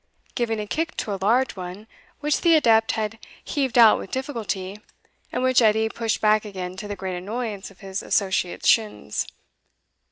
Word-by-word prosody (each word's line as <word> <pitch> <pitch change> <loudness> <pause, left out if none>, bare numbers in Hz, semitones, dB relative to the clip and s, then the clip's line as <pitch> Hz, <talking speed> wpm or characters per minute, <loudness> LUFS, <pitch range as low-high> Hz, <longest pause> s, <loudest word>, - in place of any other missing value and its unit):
giving 225 -3 -1
a 210 - -3
kick 320 +9 -3
to 210 - -2
a 195 - -5
large 245 +6 +2
one 185 +3 -7 0.4
which 300 0 +1
the 335 -2 +5
adept 225 -7 +4
had 220 0 -3 0.2
heaved 265 -5 -1
out 230 -2 +7
with - - -8
difficulty, 210 -7 -4 0.5
and 250 - -2
which 255 -1 +4
Edie 220 0 +3
pushed 225 -1 -2
back 215 0 +3
again 185 -3 -6
to 210 - -6
the 205 - -4
great 190 -1 -4
annoyance 210 +1 -4
of 195 - -20
his 195 0 -4
associate's 190 -3 0
shins. 215 - +1
215 Hz, 170 wpm, -24 LUFS, 195-240 Hz, 0.5 s, out